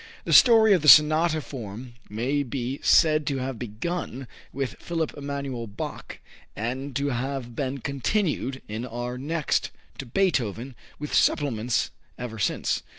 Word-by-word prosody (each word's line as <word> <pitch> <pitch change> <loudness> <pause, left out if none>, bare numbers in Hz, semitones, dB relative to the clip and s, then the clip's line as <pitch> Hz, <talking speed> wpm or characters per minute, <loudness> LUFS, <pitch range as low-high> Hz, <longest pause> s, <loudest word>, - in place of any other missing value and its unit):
The - - -1
story 225 -4 +7
of 180 - +3
the 150 - -1
sonata 155 +2 +6
form 120 -2 -8 0.2
may 125 +7 -1
be 130 0 -4
said 155 -3 +4
to 140 -3 0
have 130 -2 -4
begun 130 +3 -5 0.2
with 135 -1 -4
Philipp 165 -3 -3
Emanuel 140 -4 -5
Bach 100 - -7 0.4
and 130 +5 -4
to 140 +2 0
have 130 -1 -4
been 135 0 -3
"continued 140 - -1
in 110 +2 -5
our 120 0 -5
next" 155 +2 -1 0.3
to 135 - -6
Beethoven, 130 - 0 0.2
with 150 0 -6
"supplements" 120 -5 +1 0.3
ever 115 -3 -6
since. - - 0
135 Hz, 140 wpm, -25 LUFS, 120-150 Hz, 0.4 s, story